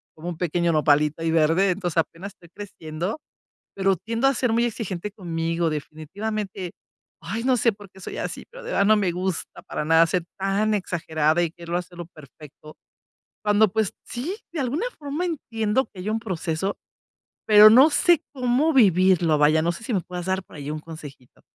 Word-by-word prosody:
como 165 +3 -6
un 165 - -6
pequeño 170 0 0
nopalito 150 +1 +2
ahí 165 0 0
verde, 165 +4 +3
entonces 175 -2 -3
apenas 170 +4 -2
estoy 170 - -19
creciendo, 185 - -6 0.6
pero 195 -1 +2
tiendo 230 +8 -1
a 275 - +1
ser 240 -2 0
muy 235 +1 +2
exigente 210 -4 -4
conmigo 165 -3 -2
definitivamente. 190 +5 -5 0.5
Ay 215 +8 -4
no 255 -1 +3
sé 230 0 +2
por 205 -2 -14
qué 190 - -18
soy - - -7
así, - - -5
pero - - -11
de - - -7
verdad - - +2
no 215 +1 +5
me 195 -4 +1
gusta 180 -1 -4
para 150 - -4
nada 165 +1 +5
ser 170 +1 -1
tan 200 +3 +1
exagerada 160 -3 0
y 170 - 0
quererlo 170 0 -4
hacerlo 175 -1 -8
perfecto. 155 -1 -15 0.7
Cuando, 210 0 +4
pues, 220 -3 0
sí, 280 +11 -4 0.2
de 315 - -3
alguna 275 - -1
forma 295 +4 -3
entiendo 230 -6 -1
que 185 - -10
hay 190 - -5
un 220 +1 0
proceso, 190 -2 -3 0.7
pero 215 0 +9
no 260 +7 +7
sé 340 +1 +4
cómo 265 +4 +1
vivirlo, 185 - +4
vaya, 155 +2 +4
no 170 +2 +1
sé 200 - -10
si 230 - -3
me 190 - +1
puedas 180 0 -7
dar 190 0 0
por - - -17
ahí 145 0 -6
un 155 - -4
consejito. 150 -6 -12
185 Hz, 185 wpm, -24 LUFS, 165-220 Hz, 0.7 s, pero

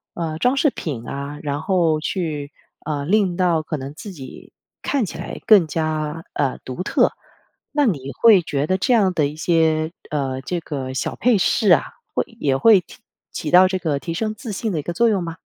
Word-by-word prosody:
呃， 160 -2 -3
装 250 +11 +1
饰 295 - +4
品 135 - -6
啊， 140 +1 -5
然 145 0 -2
后 165 -4 +1
去， 155 -5 -3 0.3
呃， 145 -2 -2
令 190 0 +2
到 175 -4 +2
可 155 - -4
能 135 +1 -7
自 200 +6 -9
己 140 -8 -11 0.3
看 275 -6 0
起 - - -7
来 - - -6
更 205 -6 +7
加， 155 0 -3
呃， 135 -3 -1
独 130 +7 -5
特。 - - +2 0.6
那 295 -1 +2
你 140 - -1
会 220 -5 +7
觉 145 -3 -2
得 185 - +1
这 245 +7 +1
样 200 -5 +3
的 155 -4 +2
一 145 - -8
些， 160 -1 +1 0.2
呃， 135 -3 -2
这 175 +6 -3
个 135 -5 -5
小 130 - -3
佩 245 -3 +3
饰 205 +3 +2
啊， - - +6 0.3
会 - - 0
也 135 -2 +1
会 205 +3 +5 0.5
起 155 - -4
到 180 +4 +7
这 185 0 -1
个 155 -5 -1
提 165 +3 -5
升 215 +5 -2
自 225 0 -7
信 210 +1 -3
的 160 - -1
一 - - -2
个 160 - -4
作 235 +7 +2
用 200 -5 +1
吗？ 165 -1 -6
165 Hz, 220 characters per minute, -21 LUFS, 145-190 Hz, 0.6 s, 更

